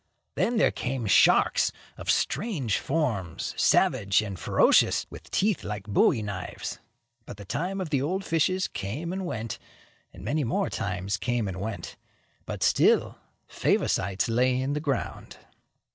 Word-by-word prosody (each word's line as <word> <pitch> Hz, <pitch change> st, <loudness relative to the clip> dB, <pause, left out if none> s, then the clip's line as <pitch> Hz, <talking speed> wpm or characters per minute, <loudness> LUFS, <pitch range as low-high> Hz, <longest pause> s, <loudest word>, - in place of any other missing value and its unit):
Then 240 Hz, 0 st, +1 dB
there 220 Hz, -, +4 dB
came 125 Hz, -2 st, -3 dB
sharks, 100 Hz, -, +4 dB, 0.2 s
of -, -, -8 dB
strange 150 Hz, -, 0 dB
forms, 115 Hz, -, -2 dB
savage 100 Hz, +2 st, +3 dB
and 100 Hz, -4 st, -6 dB
ferocious, -, -, +3 dB
with -, -, -11 dB
teeth 205 Hz, -2 st, +1 dB
like 105 Hz, -1 st, -5 dB
bowie 105 Hz, +1 st, +2 dB
knives. 100 Hz, -3 st, -5 dB, 0.5 s
But -, -, -8 dB
the 100 Hz, -, -10 dB
time 180 Hz, -, -3 dB
of 180 Hz, -5 st, -4 dB
the 140 Hz, -3 st, +2 dB
old 185 Hz, +7 st, -2 dB
fishes 185 Hz, +3 st, +1 dB
came 145 Hz, -, -5 dB
and 190 Hz, -1 st, -3 dB
went, 110 Hz, -, -4 dB, 0.5 s
and -, -, -12 dB
many 150 Hz, 0 st, 0 dB
more 115 Hz, -2 st, -1 dB
times 90 Hz, +2 st, -2 dB
came 120 Hz, +1 st, -1 dB
and 95 Hz, -1 st, -5 dB
went, 110 Hz, 0 st, -5 dB, 0.5 s
but -, -, -3 dB
still -, -, +3 dB, 0.3 s
Favosites 95 Hz, 0 st, 0 dB
lay 125 Hz, +2 st, +2 dB
in 135 Hz, +2 st, -1 dB
the 150 Hz, -, -1 dB
ground. 140 Hz, -4 st, -3 dB
120 Hz, 145 wpm, -27 LUFS, 100-160 Hz, 0.5 s, there